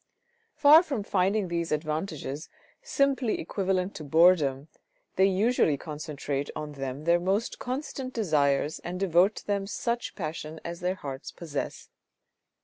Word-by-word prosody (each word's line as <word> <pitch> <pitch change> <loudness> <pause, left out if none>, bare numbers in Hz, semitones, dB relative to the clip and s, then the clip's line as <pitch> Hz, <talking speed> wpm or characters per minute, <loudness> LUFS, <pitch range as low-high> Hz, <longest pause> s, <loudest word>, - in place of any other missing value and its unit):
Far 305 +1 +8
from 275 - -3
finding 195 +1 +1
these 170 -1 -2
advantages 155 -1 -3 0.3
simply 275 - +1
equivalent 190 +2 -1
to 155 - -7
boredom, 150 -3 +4 0.5
they 190 +1 +5
usually 195 - +2
concentrate 145 -2 -4
on 150 -1 -5
them 135 0 -5
their 170 +2 +4
most 195 +6 -1
constant 260 0 -4
desires 150 - +1
and 175 - -6
and 180 - -4
devote 190 +2 +3
to - - -9
them 200 -1 -1
such 235 +3 -2
passion 155 -2 -5
as 170 0 -5
their 180 +1 -1
hearts 135 -6 -7
possess. 155 -5 -5
175 Hz, 140 wpm, -28 LUFS, 150-205 Hz, 0.5 s, Far